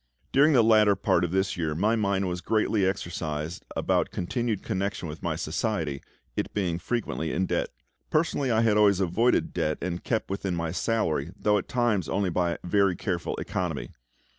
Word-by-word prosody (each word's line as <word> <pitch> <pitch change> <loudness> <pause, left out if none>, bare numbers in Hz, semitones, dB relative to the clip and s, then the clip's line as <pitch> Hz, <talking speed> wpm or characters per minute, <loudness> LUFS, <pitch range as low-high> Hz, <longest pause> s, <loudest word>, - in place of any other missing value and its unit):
During 145 +3 +5
the 120 -4 +6
latter 110 -2 +5
part 85 - +2
of 85 - 0
this 95 +2 0
year 80 -3 -2
my 105 +7 +2
mind 100 -3 0
was 90 0 -3
greatly 110 -2 +1
exercised 85 -4 -3
about - - +1
continued 115 +2 -2
connection 100 -3 -2
with 75 +1 -8
my - - -1
Society, 80 -5 -2 0.3
it - - -2
being 90 -5 0
frequently 85 -6 -2
in 95 - 0
debt. - - -1 0.4
Personally 155 -4 +1
I 115 -1 +3
had 110 -2 +3
always 100 -3 +5
avoided 100 +7 +2
debt, 75 0 0
and 90 0 -4
kept 110 -4 -1
within 95 -2 -2
my 85 -1 -2
salary, 85 -6 0
though 105 -1 +2
at - - -8
times 110 - +1
only 95 -2 0
by 85 0 0
very 100 +1 +2
careful 90 -3 -2
economy. - - -3
95 Hz, 175 wpm, -27 LUFS, 85-110 Hz, 0.4 s, the